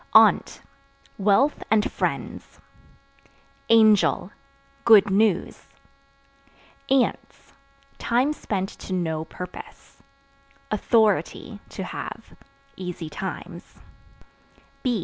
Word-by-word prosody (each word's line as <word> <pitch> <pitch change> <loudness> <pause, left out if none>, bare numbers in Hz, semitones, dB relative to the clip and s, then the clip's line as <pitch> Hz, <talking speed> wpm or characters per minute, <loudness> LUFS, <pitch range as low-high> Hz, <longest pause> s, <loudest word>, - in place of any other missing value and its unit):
Aunt - - +5 0.6
Wealth 210 +9 +2
and 210 -1 +2
friends. - - -4 1.1
Angel 215 -3 +4 0.5
Good 215 -5 +6
news. 200 -2 0 1.2
Ants 265 -2 -1 0.5
Time 250 +5 +1
spent 195 -9 -3
to 190 - -6
no 160 -3 -2
purpose. 180 +2 -11 0.7
Authority 215 0 +1
(To - - -6
have) - - -7 0.4
easy 180 -3 -6
times. 190 +4 -7
205 Hz, 70 wpm, -24 LUFS, 185-225 Hz, 1.2 s, Good